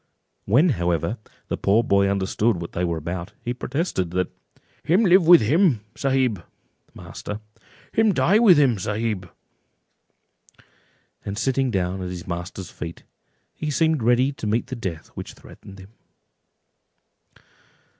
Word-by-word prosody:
When, 135 - +4
however, 90 - -1 0.3
the - - -3
poor 105 +4 +2
boy 100 -2 +3
understood 100 +1 0
what 85 - -6
they 90 - -2
were 85 -2 -1
about, 85 +2 -5
he 120 - -2
protested, 125 - -2
that—"Him 150 - -2
live 180 -2 +5
with 175 0 +9
him 145 - +3
sahib 130 -9 0 0.5
(master)—him 110 - -4
die 195 +3 +3
with 200 -8 +6
him 130 -8 +3
sahib;" 105 -2 -3 1.9
and 100 0 -5
sitting 135 +2 0
down 95 -3 -1
at 90 - -4
his 90 -1 -7
master's 90 +1 -6
feet, 85 0 -8 0.5
he 155 - -4
seemed 160 -1 +1
ready 125 +4 +3
to 125 -5 -6
meet 110 +3 0
the 130 - -6
death 95 -9 -6
which - - -9
threatened 95 - -14
him. 95 +1 -13
110 Hz, 130 wpm, -23 LUFS, 90-135 Hz, 1.9 s, with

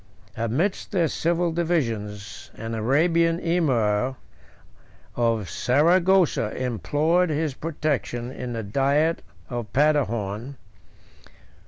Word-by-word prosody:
Amidst 130 - -1
their 175 -5 +2
civil 170 +2 0
divisions, 115 - -2
an 115 +1 -6
Arabian 165 +9 +2
emir 130 -9 +1 1.0
of 115 -4 0
Saragossa 170 - +3
implored 150 +8 +1
his 155 -1 -1
protection 140 -5 -3
in 125 -2 -5
the 115 -1 -3
diet 140 +9 +1 0.3
of 120 -5 -5
Paderborn. 130 -4 0
140 Hz, 85 wpm, -24 LUFS, 115-165 Hz, 1.0 s, Saragossa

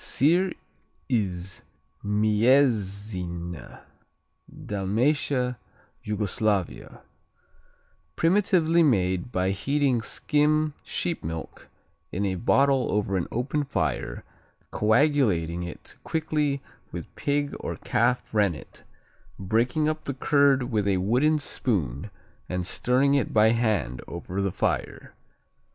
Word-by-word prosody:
Sir 175 +7 +2 0.6
Iz 95 -5 -2 0.4
Mjesine 105 - 0 0.7
Dalmatia, 125 +5 -1 0.4
Yugoslavia 105 -2 -2 1.1
Primitively 170 -2 +3
made 95 - +1
by 95 -2 0
heating 135 +3 +1
skim 150 +5 +1
sheep 170 -2 -3
milk 80 0 -7 0.4
in 100 +3 -1
a 95 - 0
bottle 135 +6 +2
over 100 -2 0
an 90 - -1
open 135 +5 -1
fire, 70 - -2 0.5
coagulating 105 - +2
it 85 -2 -8
quickly 150 -3 -1 0.3
with - - -8
pig 145 0 -1
or - - -4
calf 125 0 0
rennet, 100 -8 -1 0.5
breaking 115 - +1
up 155 0 -2
the 140 - -3
curd 140 -1 +3
with 105 -3 0
a 95 -2 +2
wooden 125 +12 +2
spoon 100 - -2 0.4
and 90 -1 -2
stirring 130 +8 +2
it 140 -5 0
by 110 +1 +6
hand 110 - 0
over 90 +3 -4
the 100 -1 0
fire. - - -2
110 Hz, 100 wpm, -26 LUFS, 95-140 Hz, 1.1 s, by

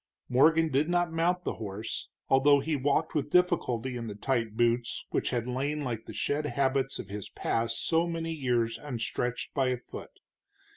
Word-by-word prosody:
Morgan 160 +5 +4
did 145 +5 +2
not 175 -1 +1
mount 175 +2 +1
the - - -2
horse, 105 +1 -4 0.2
although 140 +2 +5
he 155 +3 -1
walked 145 +3 +1
with 150 -3 -1
difficulty 130 -8 +2
in 120 -1 -4
the 105 - -6
tight 115 -1 -1
boots 120 0 +1
which - - 0
had 120 -2 -1
lain 140 +4 -2
like 115 -4 -3
the - - -8
shed 150 +1 -1
habits 135 -1 0
of 95 - -7
his 100 0 -6
past 115 0 -1
so 165 +1 +2
many 165 -1 -3
years 120 -6 0
unstretched 125 -2 -3
by 135 -3 +2
a 125 0 +1
foot. 120 - -11
135 Hz, 180 wpm, -29 LUFS, 115-155 Hz, 0.2 s, although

